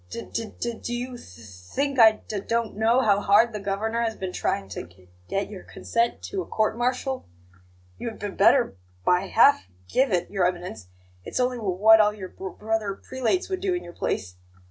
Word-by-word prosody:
D - - -5
d 230 - -1 0.4
do 240 - -3
you 250 +1 -4
th 90 - -13
th 115 - -14
think 105 - -3
I 220 -1 +9
d - - -17
d 210 - -3
don't 230 -2 -1
know 225 +4 +3
how 205 -4 +3
hard 210 +3 +4
the 210 - -3
Governor 205 +4 -1
has 225 -1 -1
been 185 -1 -5
trying 100 -1 -1
to 90 - -6
g 90 +1 -22 0.2
get 195 +1 -1
your 200 -3 -9
consent 235 0 -2
to 390 -2 -3
a - - -6
court 215 0 0
martial? 255 - -2 0.7
You 235 - -3
had 225 - -10
b 205 - -4
better 210 - +3 0.3
by 180 +2 +3
half 235 - +5
g 90 - -31 0.2
give 265 - +2
it, 180 -1 0
Your 190 -3 +2
Eminence; 175 - -5 0.4
it's - - -4
only 250 0 +1
w 200 -6 -2
what 220 +3 +7
all 210 0 +4
your 190 -3 -7
b 190 - -8
brother 215 -2 -1
prelates 260 - -1
would 375 -1 -2
do 375 -1 0
in 355 - -4
your 175 - -10
place. 90 - -3
215 Hz, 215 wpm, -25 LUFS, 190-240 Hz, 0.7 s, I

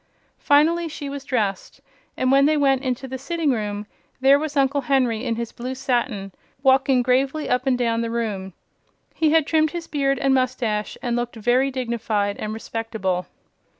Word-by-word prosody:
Finally 325 +4 +3
she 290 -2 -6
was 280 -1 -6
dressed, 210 -8 -2 0.4
and 255 0 +1
when 275 +1 +5
she 310 0 +2
went 270 -2 +3
into 260 -1 -3
the 260 0 -6
sitting 320 +1 -1
room 210 -3 -3 0.3
there 270 +2 +5
was 300 -1 -4
Uncle 275 +1 +2
Henry 245 -4 +1
in 235 -3 -1
his 235 0 -4
blue 255 +2 -5
satin, 240 -6 -1 0.3
walking 265 -1 +4
gravely 265 +4 +1
up 250 +2 0
and 255 -2 +3
down 230 -2 0
the 230 - -2
room. 210 -5 -3 0.6
He 315 - +2
had 320 -1 +4
trimmed 315 0 +2
his 340 0 -6
beard 275 -3 0
and 270 -1 +2
mustache 250 -5 -1
and 240 -2 0
looked 240 0 -3
very 245 +5 +2
dignified 230 -5 -1
and 215 - -3
respectable. 220 -5 -3
255 Hz, 175 wpm, -22 LUFS, 230-275 Hz, 0.6 s, when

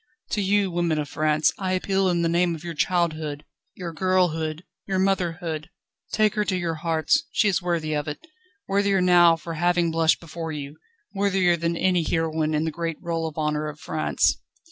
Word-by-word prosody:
To 210 - 0
you, 200 -1 +2
women 170 -2 0
of 150 -1 -3
France, 155 0 +2
I 185 -1 -1
appeal 190 +1 +1
in 170 -1 +1
the - - +2
name 170 0 +2
of 160 - -11
your 170 -1 -5
childhood, 155 -3 -1 0.3
your 175 -3 -6
girlhood, 165 -3 0 0.2
your 190 -1 0
motherhood; 175 -4 -1 0.4
take 215 -1 +2
her 210 -2 +1
to 190 -2 -1
your 170 -2 -1
hearts, 160 - +1
she 215 - +2
is 190 -2 +1
worthy 170 -3 -1
of 150 0 -2
it, 150 - -6 0.4
worthier 200 0 +2
now 175 -2 +6
for 165 +1 -7
having 175 +1 +1
blushed 165 0 +3
before 165 0 -6
you, 145 0 -6 0.4
worthier 195 -3 +2
than 170 0 -1
any 180 -1 +2
heroine 160 -1 0
in 150 - +1
the 160 - -1
great 165 0 -3
roll 165 -2 -2
of 155 - -9
honour 150 0 -1
of 150 0 -7
France." 155 -1 0
170 Hz, 190 wpm, -24 LUFS, 155-185 Hz, 0.4 s, now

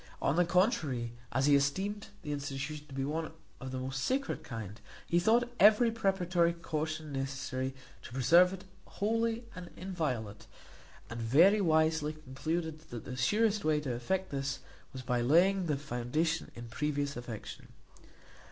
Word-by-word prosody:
On 140 - +1
the 175 +1 +4
contrary, 155 - +1 0.2
as 130 +2 +1
he 145 -1 +6
esteemed 190 +10 0 0.2
the 150 - -4
institution 145 +1 -4
to 140 - -12
be 135 - -1
of 155 -2 -5
the 130 - -4
most 135 +1 -3
sacred 265 - -1
kind, 110 -7 -7 0.2
he 170 - +2
thought 240 +6 +3
every 220 +3 +6
preparatory 185 -5 +1
caution 155 -2 -4
necessary 135 -1 -3 0.3
to - - -11
preserve 170 +9 +5
it 190 -1 -7 0.3
holy 230 +2 0
and 180 -1 -8
inviolate; 130 - -3 0.6
and 115 +1 -6
very 170 - +5
wisely 160 -2 +2
concluded, 155 +3 -4
that 120 -2 -7
the 125 - -5
surest 210 - +2
way 155 -1 +2
to 140 -4 -3
effect 180 +11 -2
this 135 -1 -2 0.3
was 130 -1 -7
by 125 -1 0
laying 175 +8 +4
the 150 -3 +1
foundation 150 +5 -1
in 120 0 -8
previous 145 +3 -2
affection. 120 -3 -7
155 Hz, 150 wpm, -32 LUFS, 130-180 Hz, 0.6 s, he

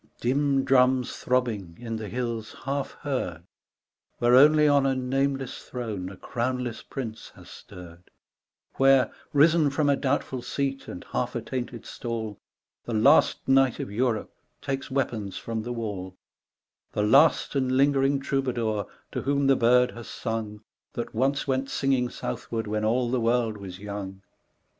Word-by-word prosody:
Dim 135 +2 +1
drums 130 -1 +3
throbbing, 110 -9 -1
in 115 -2 -4
the 110 -2 -6
hills 115 -1 -4
half 140 0 -2
heard, 125 - -3 0.7
Where 120 0 +3
only 150 +3 +7
on 145 -1 +4
a 135 - +1
nameless 135 +1 -1
throne 110 -7 -5
a 100 - -11
crownless 125 +1 -3
prince 115 -5 -7
has - - -14
stirred, 90 0 -13 0.7
Where, 135 -1 +5 0.2
risen 155 +1 +5
from 145 +1 +1
a 140 - +4
doubtful 135 -2 -1
seat 135 +2 -3
and 90 - -8
half 125 0 -2
at 115 -1 -3
tainted 120 -1 -5
stall, 110 -4 -5 0.5
The 120 - -3
last 135 +8 +4
knight 135 -2 +4
of - - -4
Europe 115 0 -1 0.3
takes 135 0 -4
weapons 115 -7 -2
from 115 -1 -4
the 120 +3 -5
wall, 100 -6 -5 0.8
The 105 - 0
last 140 +9 +4
and 130 -2 +1
lingering 140 0 +3
troubadour 120 -7 -1 0.2
to - - -3
whom 140 +1 +1
the 135 0 +5
bird 125 +1 +4
has 120 -1 -10
sung, 110 -2 -4 0.3
That 120 - -5
once 135 +5 0
went 135 0 0
singing 130 -3 +1
southward 115 -2 -4
when 105 0 -2
all 120 +2 +1
the 125 -2 +1
world 115 -1 +1
was 95 -3 -8
young. 100 -1 -7
125 Hz, 150 wpm, -26 LUFS, 110-135 Hz, 0.8 s, only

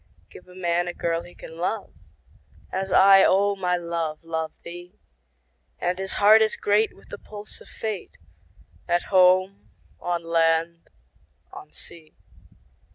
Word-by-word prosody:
Give 180 - -14
a 180 - -16
man 175 -1 0
a 175 - -5
girl 165 0 -1
he 175 - -15
can 165 +1 -12
love, 200 +4 -3 0.8
As 190 +1 -3
I, 195 0 +7
O 200 +1 +3
my 180 -2 0
love, 170 -2 -3
love 160 -1 -3
thee; 175 +1 -11 0.8
10 - - -1
And 180 +1 -3
his 190 0 -2
heart 215 +2 +6
is 220 -1 +2
great 210 +2 +1
with - - -20
the 205 - -8
pulse 210 0 -9
of - - -15
Fate, 215 -4 -6 0.7
At 175 +3 -1
home, 185 +1 +3 0.3
on 175 -1 -2
land, 165 0 0 0.6
on - - -11
sea. 160 -2 -11
180 Hz, 150 wpm, -24 LUFS, 170-195 Hz, 0.8 s, I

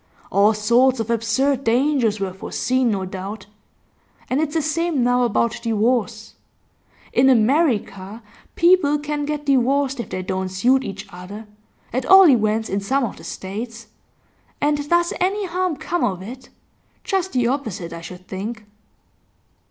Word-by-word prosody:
All 205 +2 +4
sorts 235 +4 +3
of 225 +1 -2
absurd 245 +4 +1
dangers 240 -3 +1
were 195 -2 -3
foreseen, 255 +6 -1
no 195 -3 -1
doubt. 190 +2 -7 0.9
And 265 +4 +2
it's 310 0 -2
the 320 - +2
same 310 -2 0
now 245 +1 +2
about 240 -1 0
divorce. 225 -1 -1 0.8
In 265 +2 +4
America 230 - +1 0.3
people 340 -4 +4
can 295 0 -3
get 295 0 -4
divorced 275 0 +1
if 235 - -5
they 185 - -4
don't 190 0 -3
suit 245 +8 +2
each 195 -2 -6
other 195 +5 -9 0.5
at 255 +1 -2
all 385 -1 +9
events 220 -4 +2
in 195 - -1
some 265 +8 0
of 230 - -4
the - - -13
States 220 +3 -7 0.7
and 290 0 0
does 345 0 +2
any 390 +3 0
harm 365 -1 -1
come 350 +2 -2
of 185 -2 -1
it? 255 +6 -10 0.5
Just 380 -3 -1
the 245 -2 +1
opposite 225 - -3
I 165 - -7
should 180 +2 -11
think. 210 +3 -6
240 Hz, 150 wpm, -21 LUFS, 210-285 Hz, 0.9 s, all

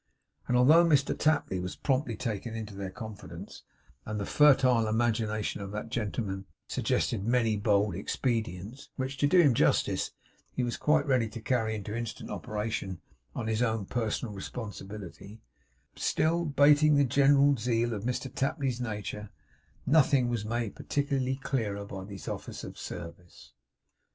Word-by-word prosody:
And 125 - +2
although 155 +7 +7
Mr 145 -5 +3
Tapley 155 -11 +1
was 90 0 -4
promptly 130 -4 0
taken 115 -1 -4
into 110 -2 -6
their 95 -1 -5
confidence; 110 0 -9 0.4
and 105 0 -4
the 100 - -2
fertile 130 -5 +5
imagination 110 -2 0
of 100 - -5
that 105 +2 -5
gentleman 105 -4 -3 0.2
suggested 95 - 0
many 115 -1 +2
bold 100 -1 +2
expedients, 110 +2 -3
which, 130 +1 -3
to 145 - +3
do 180 +5 +5
him 145 -7 +6
justice, - - +2 0.4
he 130 - -1
was 120 -1 -1
quite 150 -1 +2
ready 125 -5 +2
to 115 - -7
carry 110 -2 0
into 105 0 -5
instant 115 -1 -5
operation 105 -4 -3 0.4
on 115 - -3
his 110 +1 0
own 110 -4 0
personal 115 0 -2
responsibility; 100 -2 -8 0.6
still 170 +2 +1
'bating 145 +1 +5
the 145 0 +4
general 140 +2 +5
zeal 120 0 0
of 105 -2 -4
Mr 125 +2 -3
Tapley's 135 -3 -1
nature, 105 -2 -4 0.6
nothing 140 -4 +4
was 120 -3 -1
made 115 0 -2
particularly 135 -2 -1
clearer 115 -7 -2
by 95 -2 -7
these 100 -1 -9
offers - - -5
of - - -8
service. 85 0 -9
115 Hz, 145 wpm, -29 LUFS, 105-135 Hz, 0.6 s, although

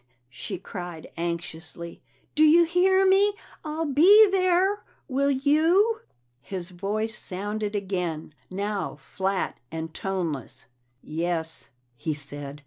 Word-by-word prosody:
she 190 - -5
cried 175 -3 -7
anxiously. 170 0 -5 0.3
"Do 310 - +4
you 320 +3 +7
hear 375 +3 +3
me? 395 +2 +4 0.3
I'll 315 +1 -2
be 365 +10 +7
there. 375 +1 +2 0.2
Will 280 0 +1
you?" 320 - +3 0.4
His 185 +5 -5
voice 210 +4 -2
sounded 205 +2 -3
again, 180 -6 -3 0.2
now 200 +2 -3
flat 190 0 -2
and 160 0 -5
toneless. 170 -10 -3 0.4
"Yes," 160 -1 -2 0.3
he 155 +6 -2
said. 145 0 -6
200 Hz, 110 wpm, -26 LUFS, -, 0.4 s, you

